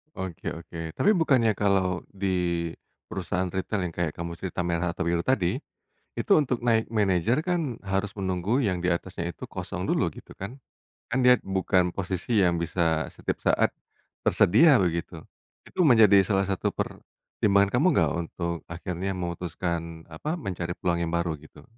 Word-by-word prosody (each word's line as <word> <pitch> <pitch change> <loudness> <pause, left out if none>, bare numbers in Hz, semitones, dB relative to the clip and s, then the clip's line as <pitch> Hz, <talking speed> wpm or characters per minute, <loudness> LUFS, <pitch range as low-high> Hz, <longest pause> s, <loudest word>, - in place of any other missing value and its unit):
Oke 95 -3 -5
oke, 85 0 -9
tapi 210 - +3
bukannya 125 - +3
kalau 95 -3 +1
di 100 -1 -3 0.8
perusahaan 95 0 -2
retail 95 +1 -2
yang 85 - -10
kayak 85 -3 0
kamu 85 +1 -6
cerita, 90 +1 -6
merah 85 0 0
atau 85 - -3
biru 85 0 +1
tadi, 100 -10 +1 0.6
itu - - -3
untuk 125 -5 -1
naik 115 -2 +2
manager 110 - +1
kan 170 -8 -1
harus 95 +1 -2
menunggu 95 +7 0
yang 90 -4 0
di 90 - -1
atasnya 85 0 -2
itu - - -11
kosong - - -5
dulu, - - +1
gitu - - -13
kan. 100 +7 -6 0.5
Kan 125 +1 0
dia 125 0 +6
bukan 95 -2 +1
posisi 95 +3 0
yang 85 -1 +2
bisa 80 -2 0
setiap - - -3
saat - - +2 0.6
tersedia, 150 - +6
begitu. 85 -4 -1 0.4
Itu 180 -4 +1
menjadi 105 -5 +7
salah 100 -2 +2
satu 95 -1 -1
pertimbangan 100 -1 0
kamu 135 +8 +2
nggak 80 -4 +3 0.2
untuk 85 0 -3
akhirnya 90 +2 -4
memutuskan 85 -1 -4
apa, 150 - -3
mencari 90 - -4
peluang 85 -1 0
yang 85 0 -1
baru, 85 -3 -1
gitu? 75 -1 -16
95 Hz, 155 wpm, -26 LUFS, 85-105 Hz, 0.8 s, menjadi